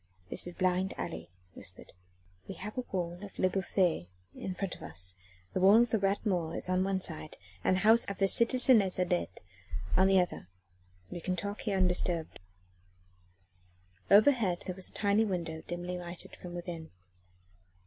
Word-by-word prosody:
"This - - +2
is 175 - -7
a - - -24
blind 185 +1 +1
alley," 170 - -5 0.2
he - - -12
whispered. 90 +1 -10 0.6
"We - - -6
have 210 +2 -7
the 255 - -4
wall 175 -2 -3
of 200 - -10
Le 185 - +2
Bouffay 180 - 0 0.2
in 185 - -5
front 195 -1 -3
of - - -11
us: 90 0 +1 0.4
the - - 0
wall 200 +5 +7
of 240 - -4
the 220 - +2
Rat 195 +3 0
Mort 175 -5 0
is - - -4
on 185 0 +2
one 195 0 0
side 155 -3 -2 0.3
and 185 - +3
the 185 - -1
house 225 +3 +5
of 200 - -5
the 195 - +3
citizeness 235 -3 +4
Adet 180 -1 -1 0.5
on 190 +1 +5
the 195 -1 +5
other. 180 - -2 0.6
We 175 - -6
can 185 +2 -1
talk 200 +3 -4
here 200 -2 -1
undisturbed." 180 -3 +1 1.7
Overhead 210 -4 +4
there 185 - -4
was 190 - +1
a - - -20
tiny 205 +1 +2
window 170 -6 -3
dimly 175 +1 -4
lighted 175 0 -8
from 175 -1 -9
within. 170 -2 -6
185 Hz, 180 wpm, -31 LUFS, 175-200 Hz, 1.7 s, wall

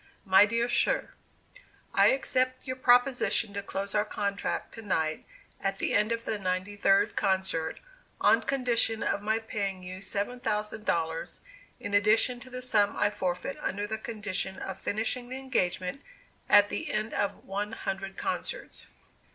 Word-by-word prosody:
"MY 195 +1 +7
DEAR 230 +2 +1
SIR: - - +1 0.8
I - - +6
accept 255 - +1
your 255 -1 -3
proposition 245 -4 +3
to 200 - -3
close 200 0 -4
our 210 - +3
contract 200 -2 -2
to 225 - -8
night, 160 -7 -1 0.4
at 195 - -1
the - - -1
end 210 +2 +3
of 230 0 -2
the 215 - -2
ninety 185 +2 -2
third 195 -1 +3
concert, 190 -4 0 0.4
on - - +5
condition 240 -4 0
of 200 - 0
my 220 +2 +1
paying 200 -4 -3
you 185 +1 -7
seven 205 +5 -3
thousand 215 -1 -2
dollars, 165 -1 -1 0.4
in 205 - -5
addition 215 +4 +3
to 255 - -12
the 255 0 -5
sum 210 -5 +2
I 205 0 +3
forfeit 185 +7 -2
under 205 +2 -2
the 220 +1 -4
condition 205 -4 -3
of 190 -1 -6
finishing 230 +4 -2
the 260 - -4
engagement 185 -4 -1 0.5
at 205 0 +7
the 315 - -3
end 215 +1 -2
of 200 - -2
one 205 +3 -3
hundred 195 -2 -4
concerts. - - -4
210 Hz, 160 wpm, -29 LUFS, 195-235 Hz, 0.8 s, MY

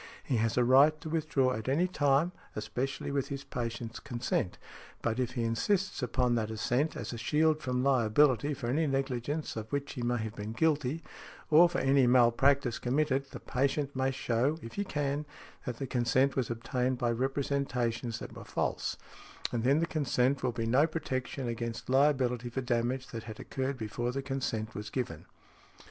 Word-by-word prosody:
He 125 - 0
has 110 0 0
a 125 - +5
right 140 +5 +6
to 160 - -6
withdraw 145 -5 +1
at 110 +2 -4
any 165 +7 +3
time, 145 -1 +2 0.2
especially 125 +6 -3
with 140 -2 0
his 140 0 -5
patient's 115 -3 -4
consent, 120 -8 -2 0.5
but 115 +1 0
if 125 -1 -1
he 120 -2 -1
insists 175 - 0
upon 125 -1 +1
that 110 -2 0
assent 125 +7 0
as 115 +1 -5
a 120 - -5
shield 155 +5 +2
from 125 -1 -1
liability 135 +2 +3
for 130 - -6
any 150 +7 +1
negligence 135 +2 -2
of 110 -1 -6
which 140 0 -2
he 125 - -5
may 120 0 +1
have 110 -1 -4
been 105 +1 -5
guilty, 150 +2 +1 0.5
or 170 +3 +8
for 175 - -2
any 135 -3 +4
malpractice 125 +1 +4
committed, 135 +1 +1
the - - -8
patient 140 +2 -1
may 130 0 +1
show, 130 +3 0
if 115 - -8
he 200 - -1
can, 145 -5 -1 0.4
that 125 -2 -3
the 135 - -3
consent 130 +2 +2
was 130 -4 0
obtained 125 +2 -1
by 120 -1 +1
representations 125 -2 -1
that - - -8
were - - -8
false; - - -2 0.5
and 115 -2 -1
then 135 +4 +4
the 165 - +2
consent 140 -4 +1
will 125 - +1
be 115 -1 -3
no 130 +7 +4
protection 135 -4 -3
against 115 +1 -4
liability 130 -3 +2
for 130 +3 -3
damage 125 +1 0
that 115 -2 -6
had 110 -1 -8
occurred 135 0 -3
before 120 +2 -2
the 135 +2 -3
consent 125 -5 -2
was 105 +1 -6
given. 110 - -4
130 Hz, 180 wpm, -31 LUFS, 120-140 Hz, 0.5 s, or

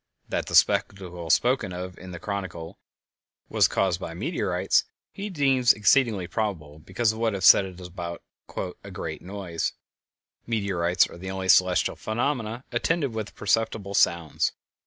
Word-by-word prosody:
That - - -2
the - - -2
spectacle 90 -4 +2
spoken 120 -3 +2
of 90 0 -6
in 95 - -10
the 90 - -7
chronicle 90 -4 -6 0.7
was - - +4
caused 95 -3 0
by 85 - -6
meteorites - - +1 0.3
he 200 +1 -6
deems 135 - +3
exceedingly 105 -3 +3
probable 85 -8 -4
because 95 +8 0
of 110 - -8
what 115 -3 +1
is 95 - -1
said 100 - +8
about 90 -1 -7 0.6
"a - - -9
great - - -6
noise;" 95 -3 -4 0.7
meteorites 95 -6 +1
are - - -12
the 95 +1 -6
only 95 0 -4
celestial 90 -1 +4
phenomena 120 0 -2
attended 140 +2 0
with 110 -1 -5
perceptible 105 -1 0
sounds. 85 -5 +2
100 Hz, 140 wpm, -26 LUFS, 90-115 Hz, 0.7 s, said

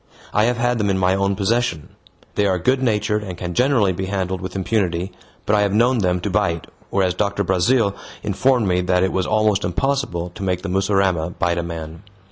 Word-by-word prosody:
I 105 - +3
have 120 0 +1
had 120 0 +1
them 105 -1 +1
in 95 - +1
my 95 0 +2
own 100 0 +1
possession. 105 -5 -1 0.4
They 105 - +1
are 95 -1 +1
good 130 +9 +1
natured 105 -3 +1
and 90 -3 -7
can 90 -1 -4
generally 125 -4 +3
be 95 +2 -4
handled 95 -1 -2
with 95 0 -6
impunity, 95 -2 -1 0.3
but 105 - +2
I 105 - +3
have 100 0 +1
known 120 +2 +3
them 90 -2 +1
to 105 - -2
bite, 85 -5 0 0.2
whereas 95 -2 +1
Doctor 100 +2 -1
Brazil 100 +3 +2 0.3
informed 115 +2 +2
me 90 -1 +2
that 90 0 +2
it 95 - +1
was 95 -1 0
almost 110 -2 +2
impossible 90 -4 -1
to - - -10
make 90 -2 -1
the 100 - -3
mussurama 95 -3 +1
bite 85 0 0
a - - 0
man. 80 -1 -7
95 Hz, 210 wpm, -21 LUFS, 90-105 Hz, 0.4 s, I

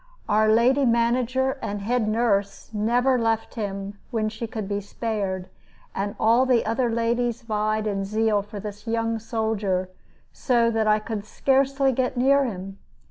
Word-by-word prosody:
Our 215 +1 +3
lady 245 +5 +4
manager 250 +2 +1
and 205 0 -3
head 235 0 0
nurse 215 -2 0
never 245 +5 +2
left 225 -1 0
him 200 -2 -5
when 220 -3 -1
she 225 +2 -6
could 220 -3 -5
be 205 0 -2
spared, 200 -3 -3 0.5
and 200 +1 -3
all 235 +4 +4
the 245 -3 +3
other 235 +3 0
ladies 235 +1 0
vied 215 -1 -1
in 200 -2 -1
zeal 215 +1 +1
for 205 +1 -8
this 210 +2 -8
young 225 0 0
soldier, 215 -5 -1 0.4
so 235 -3 +2
that 220 -1 0
I 210 0 +5
could 215 -1 -5
scarcely 270 +4 +2
get 255 0 -1
near 275 +2 +4
him. 195 -3 -6
225 Hz, 155 wpm, -24 LUFS, 210-240 Hz, 0.5 s, I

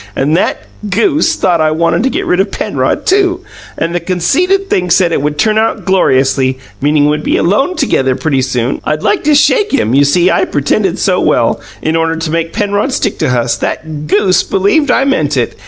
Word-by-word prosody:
And 145 +4 0
that 180 - -1 0.3
GOOSE 310 - +1
thought 170 -3 +1
I 155 - +2
WANTED 165 +5 0
to 265 - +1
get - - -3
rid 180 - 0
of 195 +1 +1
Penrod, - - -2
too; 370 -2 +1 0.4
and 165 +1 -2
the 175 - 0
conceited 300 - 0
thing 180 - -1
said 175 0 +3
it 165 - 0
would 150 +1 -2
turn 215 +6 +2
out 225 - -1
'gloriously,' 135 -8 +1 0.2
meaning 145 +1 +2
we'd 150 0 0
be - - 0
alone 270 - +1
together 135 - 0
pretty 140 -3 -1
soon 125 -1 -2
I'd 155 0 -2
like 415 - 0
to 300 -1 +3
shake 420 +8 +2
him! 125 - 0
You 140 +2 +4
see, 170 +6 +2
I - - +1
pretended 170 +6 -1
so 185 -2 0
well, 115 - +1 0.2
in 160 +1 0
order 165 0 0
to 165 -1 -4
make 165 0 -2
Penrod 205 +4 -1
stick 210 -6 -2
to - - 0
us, 125 -2 0
that 155 -1 -5
GOOSE 195 +1 +2
believed 205 +10 0
I 265 +2 +2
meant 150 - 0
it! 120 - -1
170 Hz, 205 wpm, -12 LUFS, 150-220 Hz, 0.4 s, You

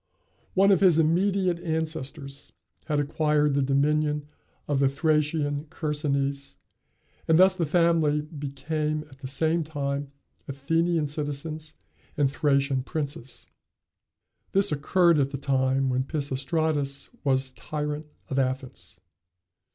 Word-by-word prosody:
One 195 +1 +5
of 195 - +5
his 180 -5 +5
immediate 180 +2 +2
ancestors 155 -4 -4 0.3
had 150 -2 0
acquired 150 0 +1
the 140 - +2
dominion 150 +2 +1 0.4
of 145 -2 +1
the 135 -1 +4
Thracian 150 0 0
Chersonese, 140 -3 -2 0.7
and 160 - +5
thus 185 +1 +6
the 170 -4 -1
family 160 -2 +3
became 150 +1 -3
at 135 - -16
the 135 - -6
same 160 +5 +1
time 140 -2 -3 0.4
Athenian 165 +4 0
citizens 150 +1 -4 0.4
and 140 -2 +2
Thracian 140 -2 +1
princes. 140 -4 -5 1.1
This 195 +1 +4
occurred 170 +3 +3
at 135 -1 +2
the 140 - -4
time 135 0 +1
when 130 +1 +1
Pisistratus 140 0 -1
was 130 -2 +1
tyrant 150 +5 -4 0.2
of 135 - -1
Athens. 130 -7 -3
150 Hz, 115 wpm, -26 LUFS, 140-160 Hz, 1.1 s, thus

